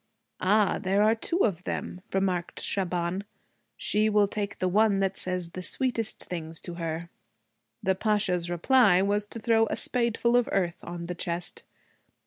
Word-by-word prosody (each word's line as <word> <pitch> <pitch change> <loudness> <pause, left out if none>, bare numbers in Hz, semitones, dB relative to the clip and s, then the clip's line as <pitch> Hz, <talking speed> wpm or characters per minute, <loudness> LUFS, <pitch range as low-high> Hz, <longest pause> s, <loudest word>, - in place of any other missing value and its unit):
'Ah, 205 +1 +3
there 195 +1 +2
are 215 +1 +5
two 335 - 0
of 185 -5 -2
them,' 180 - -4
remarked 185 -3 -1
Shaban. 180 0 -1 0.5
'She 215 +1 +1
will 210 -1 +4
take 200 0 -4
the 185 - 0
one 205 +1 +3
that 195 0 0
says 180 -2 -4
the 185 - -6
sweetest 230 +2 -1
things 165 -2 -6
to 175 - -7
her.' 170 0 -4 0.7
The 190 - +3
Pasha's 190 -4 0
reply 190 +1 +4
was 205 +1 +1
to 230 - -8
throw 225 0 +3
a - - -2
spadeful 235 -1 +2
of 245 -1 +3
earth 180 -3 0
on 175 0 -6
the 175 +1 -4
chest. 170 0 -3
195 Hz, 160 wpm, -27 LUFS, 175-215 Hz, 0.7 s, are